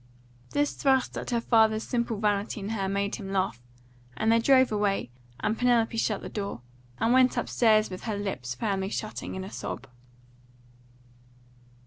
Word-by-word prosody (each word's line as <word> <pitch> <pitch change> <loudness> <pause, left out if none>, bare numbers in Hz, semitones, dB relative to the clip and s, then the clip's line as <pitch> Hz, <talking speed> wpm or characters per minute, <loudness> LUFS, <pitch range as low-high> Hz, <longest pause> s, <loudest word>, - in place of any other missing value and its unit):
This 290 0 0
thrust 265 -2 +1
at - - -5
her 240 -1 +1
father's 220 -2 +3
simple 235 -3 -1
vanity 205 0 0
in 200 +1 -5
her 195 -4 -1
made 200 +1 -1
him 195 -3 -7
laugh; 185 -11 -1 0.6
and 220 +1 +2
then 230 - +5
they - - -3
drove 260 -2 +5
away, 205 - 0 0.3
and 220 - 0
Penelope 235 -2 +2
shut 220 -2 0
the - - -5
door, 200 - -5 0.4
and 225 +2 +2
went 255 0 +4
upstairs 215 -3 +3
with 185 - -7
her 215 -3 -2
lips 135 -12 -4
firmly 195 - -1
shutting 215 -1 -5
in 190 - -4
a 190 - -8
sob. - - -5
215 Hz, 165 wpm, -27 LUFS, 195-230 Hz, 0.6 s, then